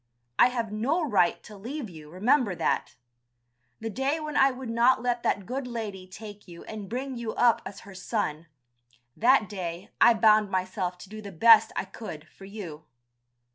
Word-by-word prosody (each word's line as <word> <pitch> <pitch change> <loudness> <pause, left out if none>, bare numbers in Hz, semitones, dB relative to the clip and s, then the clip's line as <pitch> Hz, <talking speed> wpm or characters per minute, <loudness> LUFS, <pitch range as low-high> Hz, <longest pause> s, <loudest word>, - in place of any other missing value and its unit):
I - - +8
have 235 -4 -3
no 280 +10 0
right 185 -8 +2
to 210 - -12
leave 245 +6 -6
you, 155 -5 -12
remember 210 - +2
that. - - -1 0.8
The 225 0 -4
day 270 +7 -1
when 305 -1 -5
I 270 -1 +6
would 255 -2 -6
not 240 +3 +3
let 245 -1 0
that 200 -4 0
good 255 +3 -4
lady 210 -6 -6
take 205 +2 -11
you 170 -1 -11
and 210 -3 -8
bring 260 +2 -4
you 230 -2 -4
up 240 -2 +4
as 200 - -10
her 200 - -12
son, 180 -5 -3 0.7
that 240 -1 +4
day 185 0 -6
I 235 - +7
bound 215 -1 +4
myself 185 -1 -2
to - - -14
do 215 +1 -8
the 200 -1 -8
best 220 +5 +6
I - - -2
could 180 -6 -9
for 195 - -14
you. 180 -7 -8
215 Hz, 180 wpm, -27 LUFS, 190-245 Hz, 0.8 s, I